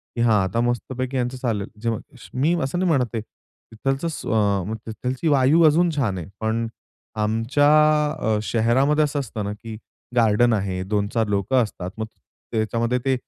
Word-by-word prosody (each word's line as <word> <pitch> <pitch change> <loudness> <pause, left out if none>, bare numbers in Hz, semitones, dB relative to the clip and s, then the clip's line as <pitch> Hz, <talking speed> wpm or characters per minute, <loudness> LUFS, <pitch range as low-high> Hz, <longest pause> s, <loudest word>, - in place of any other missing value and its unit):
की 120 - -1
हां 110 -4 +4
आता 115 +6 -1
मस्तपैकी 130 +2 -2
यांचं 125 +1 -1
चालेल. 110 -6 -2
जेव्हा 115 -2 -1 0.4
मी 155 +6 +3
असं 140 +7 -2
नाही 185 - +1
म्हणत 130 -4 +3
आहे, 110 - -1
तिथलंच 135 +7 -6
स्व 105 -2 0
तिथलंची 125 +7 -3
वायू 145 +3 +4
अजून 170 +4 +4
छान 110 -10 0
आहे. 85 - -6
पण 115 +1 -1 0.6
आमच्या 115 +7 +2 0.5
अ, 110 -4 +1
शहरामध्ये 130 +8 +2
असं 145 -1 -1
असतं 110 -5 -4
ना, 100 - -3
की 110 +1 -9 0.4
गार्डन 115 0 +4
आहे, 95 -3 -1
2-4 105 +3 0
लोकं 105 +6 +2
असतात, 95 -4 -6
मग 110 - -2 0.5
त्याच्यामध्ये 115 +3 0
ते 135 - +3
115 Hz, 160 wpm, -23 LUFS, 110-130 Hz, 0.6 s, हां